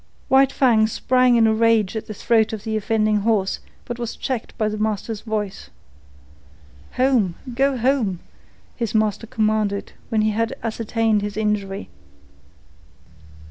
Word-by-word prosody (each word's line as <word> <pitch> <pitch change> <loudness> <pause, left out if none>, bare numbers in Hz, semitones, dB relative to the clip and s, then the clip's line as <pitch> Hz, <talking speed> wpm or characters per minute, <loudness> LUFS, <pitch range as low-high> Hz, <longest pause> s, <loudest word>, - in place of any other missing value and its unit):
White 270 0 +5
Fang 225 -5 +3
sprang 250 +2 +2
in 230 -1 +5
a 220 - +4
rage 225 -3 +2
at 220 - -4
the 215 - -5
throat 225 0 +2
of 215 - -5
the 220 -1 -2
offending 215 0 +1
horse, 205 -2 0 0.3
but 240 0 -6
was 235 -1 -4
checked 255 -4 -4
by 215 -3 +1
the 215 0 -3
master's 215 0 -2
voice. 210 -3 -4 1.2
"Home! 250 -9 +2 0.2
Go 270 +2 +1
home!" 235 -7 +1 0.6
the 230 -3 -1
master 215 +1 0
commanded 215 -3 -1 0.2
when 220 -1 +1
he 215 - +2
had 225 +2 -1
ascertained 225 -1 0
his 205 0 -4
injury. 205 -2 -2
220 Hz, 140 wpm, -22 LUFS, 210-235 Hz, 1.2 s, White